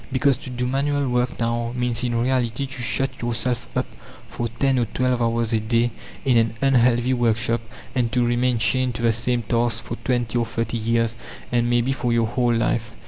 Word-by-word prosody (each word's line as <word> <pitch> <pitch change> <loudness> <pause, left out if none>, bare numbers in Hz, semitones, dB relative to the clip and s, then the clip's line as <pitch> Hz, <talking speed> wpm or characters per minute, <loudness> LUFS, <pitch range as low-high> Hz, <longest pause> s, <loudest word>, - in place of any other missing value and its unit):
Because, 135 +1 +3
to 130 - -9
do 125 0 -2
manual 140 +2 0
work 125 0 0
now, 115 0 -1
means 125 -1 -1
in 120 -1 0
reality 125 0 0
to 135 -1 -8
shut 130 +3 -1
yourself 120 0 -1
up - - +1 0.4
for 120 - -3
ten 130 +3 +1
or 120 - +2
twelve 125 +2 0
hours 115 0 +1
a 110 - +3
day 115 +2 +1 0.3
in 125 -3 +4
an 115 0 +2
unhealthy 125 -2 +3
workshop, 115 -1 +1 0.3
and 120 -3 0
to 125 -2 +2
remain 120 +1 +1
chained 120 +4 +1
to 120 - -4
the 115 -1 +4
same 120 +1 0
task 120 +1 0
for - - -5
twenty 120 -2 -1
or 120 - +1
thirty 115 0 -2
years, 115 0 +1 0.4
and 120 -1 +2
maybe 120 +2 +2
for 125 -3 -1
your 115 -1 +3
whole 120 +1 +1
life. 115 0 0
120 Hz, 195 wpm, -23 LUFS, 115-125 Hz, 0.4 s, in